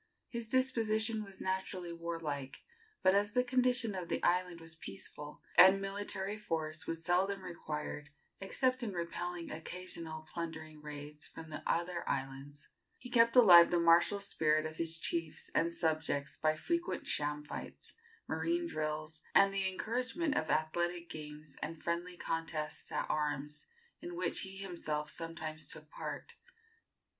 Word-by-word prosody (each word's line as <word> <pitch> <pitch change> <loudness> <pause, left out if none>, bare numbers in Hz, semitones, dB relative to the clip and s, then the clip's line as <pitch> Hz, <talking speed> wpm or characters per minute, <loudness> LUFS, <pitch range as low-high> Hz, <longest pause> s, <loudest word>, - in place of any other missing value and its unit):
His 235 -2 -4
disposition 225 -4 +2
was 195 -2 -11
naturally 185 -2 -2
warlike, 165 -5 -4 0.4
but 185 - +6
as 205 +1 +2
the 250 - +4
condition 250 -3 +3
of 180 -3 -5
the - - -1
island 180 -1 +2
was 165 0 -9
peaceful, 150 +1 -7 0.2
and 190 +1 +10
military 195 +1 -3
force 160 -5 -3
was 165 0 -3
seldom 190 +2 +2
required 150 -4 -5 0.3
except 255 +6 +1
in 220 -5 -3
repelling 175 0 -3
occasional 160 -1 -5
plundering 160 -2 -5
raids 150 0 -7
from 160 -1 -10
the 155 - -5
other 170 +1 0
islands, 135 +1 -4 0.3
he 250 - -10
kept 230 0 +5
alive 175 -9 +10
the 175 - +3
martial 170 +4 +5
spirit 155 -6 +2
of 155 0 -5
his 165 -1 0
chiefs 165 0 -2
and 170 +1 +2
subjects 155 -4 0
by 155 0 +2
frequent 340 - -1
sham 150 0 0
fights, 145 - -7 0.3
marine 340 +1 0
drills, 155 - -3
and 195 0 +7
the 195 -1 +1
encouragement 250 - -1
of 155 - 0
athletic 175 +2 0
games 150 -1 -8
and 160 +1 -5
friendly 175 +1 -2
contests 160 -2 -3
at - - -1
arms, 150 -1 -2 0.3
in 350 +1 -6
which 355 - +1
he 190 0 -3
himself 170 -6 -3
sometimes 160 -1 -4
took - - -9
part. - - -6
170 Hz, 145 wpm, -34 LUFS, 155-195 Hz, 0.4 s, and